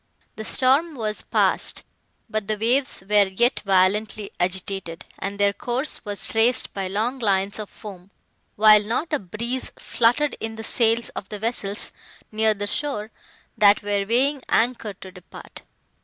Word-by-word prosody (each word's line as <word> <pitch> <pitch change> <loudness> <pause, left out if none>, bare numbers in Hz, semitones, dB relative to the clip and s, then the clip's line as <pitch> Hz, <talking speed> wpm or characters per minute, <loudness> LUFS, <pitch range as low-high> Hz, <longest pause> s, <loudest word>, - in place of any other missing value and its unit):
The 220 - -7
storm 275 +8 +4
was 215 -4 -2
passed, - - 0 0.4
but 215 -3 -3
the 215 -1 -1
waves 245 +1 +1
were 205 -1 +4
yet 235 +6 +1
violently 200 +2 +1
agitated, 180 -1 -3
and 200 +1 -4
their 200 0 +3
course 250 +7 -2
was 205 -2 -3
traced 235 +3 +2
by 195 -1 -3
long 220 +7 -2
lines 200 -2 0
of 210 - -6
foam, 195 -3 -12 0.5
while 210 0 +6
not 250 +10 -2
a 300 - +2
breeze 235 +7 -5
fluttered 245 +6 +1
in 225 0 -5
the 225 - -7
sails 230 +1 +2
of 195 - -8
the 210 - -5
vessels, 205 -2 -2 0.4
near 220 0 +2
the 205 0 -4
shore, 220 -2 -3 0.4
that 205 0 +4
were 205 -1 0
weighing 270 +4 +2
anchor 225 -3 0
to 190 0 -12
depart. 180 -1 -13
215 Hz, 155 wpm, -23 LUFS, 200-235 Hz, 0.5 s, while